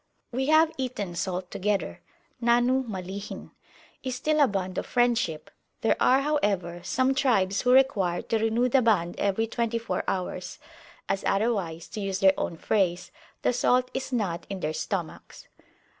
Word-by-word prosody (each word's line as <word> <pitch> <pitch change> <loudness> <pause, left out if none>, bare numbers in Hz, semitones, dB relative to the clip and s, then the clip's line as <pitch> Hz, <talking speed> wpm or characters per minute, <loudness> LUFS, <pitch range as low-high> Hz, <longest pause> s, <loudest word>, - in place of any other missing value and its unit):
We 265 +2 -1
have 315 +1 +5
eaten 225 -8 -3
salt 180 +1 -3
together 200 0 -2 0.4
(Nahnu 245 +2 +3
Malihin) 195 0 -6 0.5
is 255 -1 -3
still 305 +4 0
a 285 - +6
bond 190 -3 -2
of - - -6
friendship: 235 -11 0 0.3
there 225 - +3
are, 260 +2 +4
however, 200 - 0
some 260 +1 +1
tribes 215 -8 +2
who 250 - +2
require 215 -10 +3
to 225 - 0
renew 225 +3 +2
the 255 +1 +3
bond 200 -7 +2
every 200 +3 +1
twenty 230 0 -1
four 230 0 -3
hours, 185 -1 -3 0.5
as 195 - -1
otherwise, 195 -6 0
to 215 - -6
use 195 -1 -2
their 195 -1 +6
own 165 - -3
phrase, 180 -1 0 0.3
the - - +2
salt 250 +1 +2
is 265 0 -4
not 190 -8 -2
in 195 -2 -5
their 155 0 -1
stomachs. - - -5
220 Hz, 160 wpm, -27 LUFS, 185-250 Hz, 0.5 s, a